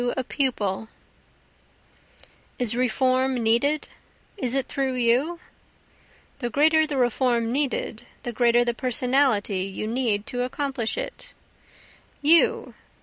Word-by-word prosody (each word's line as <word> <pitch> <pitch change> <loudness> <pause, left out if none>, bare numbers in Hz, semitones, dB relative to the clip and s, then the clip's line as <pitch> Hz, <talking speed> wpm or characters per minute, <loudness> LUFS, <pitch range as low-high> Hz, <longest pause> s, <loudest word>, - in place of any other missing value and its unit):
To 245 +2 -1
a - - -1
Pupil 220 -7 -1 1.7
Is 235 -2 +2
reform 255 +1 +1
needed? 240 +6 +1 0.5
is 255 - -2
it 270 -1 0
through 270 -2 -2
you? 255 +8 +1 1.0
The 240 -3 -2
greater 315 +4 +3
the 290 -2 -3
reform 240 -2 +1
needed, 260 -4 -2 0.2
the 240 - -4
greater 240 +1 +3
the 240 - 0
Personality 250 -5 +1
you 195 +2 -4
need 220 -3 -1
to 245 - -3
accomplish 255 - -2
it. - - -7 0.9
You! 325 +3 +4
250 Hz, 115 wpm, -24 LUFS, 235-275 Hz, 1.7 s, You